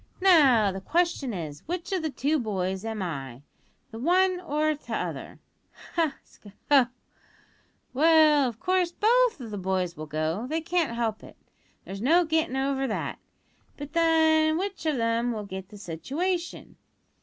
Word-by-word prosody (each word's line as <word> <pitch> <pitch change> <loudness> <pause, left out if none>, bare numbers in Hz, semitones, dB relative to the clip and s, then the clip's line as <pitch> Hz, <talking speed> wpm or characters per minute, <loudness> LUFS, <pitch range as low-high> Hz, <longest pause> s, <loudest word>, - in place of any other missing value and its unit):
Now, 275 - +5
the 190 0 -6
question 335 - 0
is, 155 -7 -6
which 355 +3 -4
o' 375 - +1
the 315 -2 -2
two 290 +2 0
boys 190 -4 -2
am 220 -3 -4
I 135 -6 -6 0.5
the 225 - -8
one 365 +6 +2
or 310 -2 0
the 300 - -13
t'other - - -5 0.6
ha! 320 -5 0
sk! - - -20 0.2
ho! 270 -4 +6 1.1
Well, 305 -1 +5
of 230 -1 -11
course, 365 -1 +1
both 470 +2 +2
o' 245 - -7
the 210 -2 -6
boys 185 -2 -1
will 155 0 -7
go; 155 - -2
they 315 +4 -1
can't 330 -6 -1
help 225 -2 -2
it, - - -14 0.5
there's 195 +1 -7
no 335 +8 +4
gittin' 315 -4 0
over 270 0 0
that; 220 - -4 0.6
but, 290 0 -8
then, 320 -1 +3
which 380 -3 -4
of 300 -3 +1
'em 230 +1 0
will 210 -2 -5
git 190 -1 -8
the 210 - -12
situation? 315 - -4
275 Hz, 160 wpm, -26 LUFS, 205-330 Hz, 1.1 s, ho